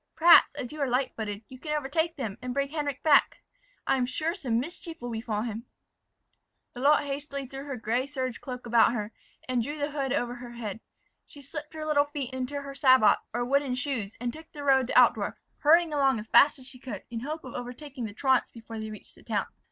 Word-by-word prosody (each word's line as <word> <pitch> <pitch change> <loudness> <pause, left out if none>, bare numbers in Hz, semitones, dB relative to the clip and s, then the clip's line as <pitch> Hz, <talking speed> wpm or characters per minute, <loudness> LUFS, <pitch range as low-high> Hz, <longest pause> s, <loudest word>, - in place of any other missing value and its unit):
Perhaps, 340 +1 +7
as 250 - -5
you 305 -1 -6
are 280 - +2
light 255 +1 0
footed, 210 -1 -5
you 255 +2 -12
can 300 +1 -2
overtake 320 +4 -1
them, 230 -6 -5
and 250 0 -4
bring 280 0 0
Henric 285 -2 -3
back. 295 -3 +4 0.4
I - - +2
am 250 -1 0
sure, 320 +5 -1
some 250 - -1
mischief 330 +4 -6
will 245 0 -5
befall 220 -2 -2
him." 230 0 -5 1.1
Lalotte 285 +4 +3
hastily 280 0 -4
threw 270 +2 -8
her 275 -3 -5
gray 240 +4 -1
serge 260 -4 -4
cloak 250 -2 -7
about 235 0 +4
her, 210 -2 -3 0.4
and 255 -2 +1
drew 290 +6 -4
the 290 0 -2
hood 275 -3 -2
over 245 0 0
her 240 -1 -9
head. 220 -3 -5 0.4
She 290 - -14
slipped 300 +3 -8
her 310 -1 -4
little 290 -2 +3
feet 285 -3 -5
into 260 +2 -3
her 275 0 -7
sabots, 260 -5 +5
or 240 +2 -1
wooden 275 0 +1
shoes, 250 -6 -3
and 240 0 -2
took 320 +1 -12
the 290 -2 -7
road 265 -3 +4
to - - +1
Altdorf, - - +3 0.2
hurrying 325 +1 +5
along 275 -4 +3
as 215 - -6
fast 290 +6 +6
as 260 - -13
she 255 -1 -10
could, 230 -7 -7
in 230 - -3
hope 305 +6 -5
of 255 - -9
overtaking 250 +1 -6
the 205 - -6
truants 265 0 +2
before 225 -1 -9
they 220 0 -5
reached 215 - -11
the - - -18
town. - - -1
260 Hz, 220 wpm, -28 LUFS, 240-290 Hz, 1.1 s, Perhaps